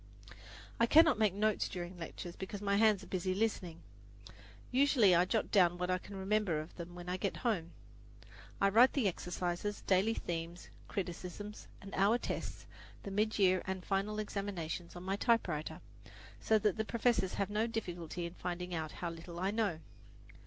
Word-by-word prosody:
I 235 - +4
cannot 315 -4 +6
make 215 -3 +4
notes 215 0 +1
during 175 0 -5
the 180 - -14
lectures, 170 +1 -7
because 195 +2 -6
my 200 0 +1
hands 215 -2 +4
are - - -9
busy 185 0 -1
listening. 185 -6 -1 0.9
Usually 255 -7 +5
I 175 +1 +5
jot 220 +4 0
down 175 -4 +4
what 180 +1 -1
I 185 - +1
can 200 +2 -10
remember 195 -4 +1
of 155 +2 -8
them 175 0 -8
when 175 0 -9
I 180 +1 -1
get 195 +1 -2
home. 175 -8 0 0.9
I 195 - +4
write 235 +6 +6
the 260 -8 +2
exercises, 180 +2 -3
daily 200 +4 +2
themes, 170 +1 -5 0.2
criticisms 190 +2 -5 0.2
and 195 - -9
hour 200 +5 +4
tests, - - -5 0.4
the 200 - -6
mid 215 +2 +1
year 185 -2 +4
and 190 -1 -3
final 200 +2 0
examinations, 190 -5 -4
on 175 - -7
my 195 +1 -1
typewriter, 185 -10 0 0.6
so 220 - +3
that 210 -2 +1
the 220 - +1
professors 225 -4 +1
have 200 0 -1
no 215 +2 +1
difficulty 175 -6 -4
in 170 - -6
finding 180 0 -4
out 160 -2 -3
how 170 -1 -4
little 170 +1 -8
I 190 +2 0
know. 205 -7 0
190 Hz, 175 wpm, -34 LUFS, 175-210 Hz, 0.9 s, cannot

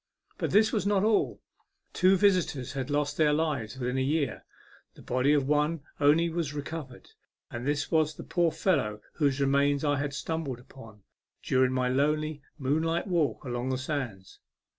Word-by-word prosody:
But - - -1
this 215 +1 +4
was 210 -3 0
not 200 -1 +2
all; 215 0 +1 0.5
two 190 +1 +4
visitors 180 -11 +1
had 135 -2 -4
lost 145 0 -1
their 150 -2 +4
lives 145 -7 -1
within 125 +1 -1
a - - +1
year. 140 0 -1 0.5
The - - -14
body 130 +3 +1
of 145 -3 +2
one 150 +2 +1 0.2
only 150 +4 +4
was 165 -3 -3
recovered, 145 -3 -7 0.4
and 120 +2 -5
this 145 0 -1
was 155 -2 +2
the - - -8
poor 170 -2 +1
fellow 130 - 0
whose 145 -3 +1
remains 140 +1 +2
I 145 -1 +2
had 145 -1 -3
stumbled 140 -3 -3
upon 115 -5 -14 0.4
during 130 0 +2
my 130 -1 +1
lonely 150 +3 0 0.2
moonlight 160 +5 0
walk 170 -7 0
along 120 0 -3
the 130 - 0
sands. 130 -9 -5
145 Hz, 165 wpm, -28 LUFS, 130-160 Hz, 0.5 s, this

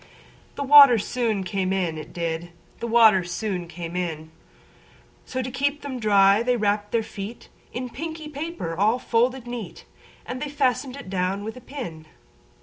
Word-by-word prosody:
The 280 - -3
water 280 -2 +9
it 220 - 0
soon 225 -5 -1
came 190 0 -1
in, 180 -4 0
it 155 - -8
did; 170 0 -3 0.3
The 235 - -3
water 225 -4 +6
it 175 -1 -6
soon 180 -2 -3
came 170 0 -7
in:So, 165 - -8
to 255 - -5
keep 285 +3 -1
them 265 -3 -5
dry, 200 -1 +5
they 245 +1 +1
wrapp'd 205 -1 0
their 230 -1 +1
feetIn 215 +1 -8 0.3
a 250 +1 -3
pinky 320 +4 -6
paper 300 - -5
all 210 +6 +3
folded 245 +1 0
neat:And 245 +2 -9
they 295 - -3
fasten'd 265 -2 0
it 280 -9 -9
down 190 +1 -1
with 220 +2 -6
a 255 - -11
pin. 225 - -8
220 Hz, 165 wpm, -24 LUFS, 185-255 Hz, 0.3 s, water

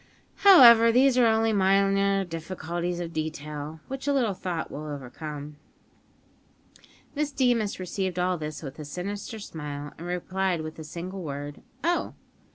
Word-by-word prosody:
However, 235 - +8
these 260 +2 +4
are 240 - +6
only 225 0 +2
minor 195 0 +3
difficulties 175 +1 -4
of 170 -1 -5
detail, 150 0 -5
which 270 +1 -6
a 285 - +3
little 240 -7 +1
thought 180 -3 -4
will 155 +1 -6
overcome." 145 +1 -7 1.6
Miss 295 0 -1
Deemas 240 -8 +1
received 185 0 -3
all 180 +1 +1
this 155 -1 -6
with 135 +1 -8
a 150 - -6
sinister 200 - -5
smile, 145 -7 -7
and 170 - -7
replied 180 0 -1
with 155 0 -6
the 160 - -7
single 175 +5 -7
word, 145 -2 -6 0.2
"Oh!" 345 +2 0
180 Hz, 145 wpm, -26 LUFS, 155-215 Hz, 1.6 s, However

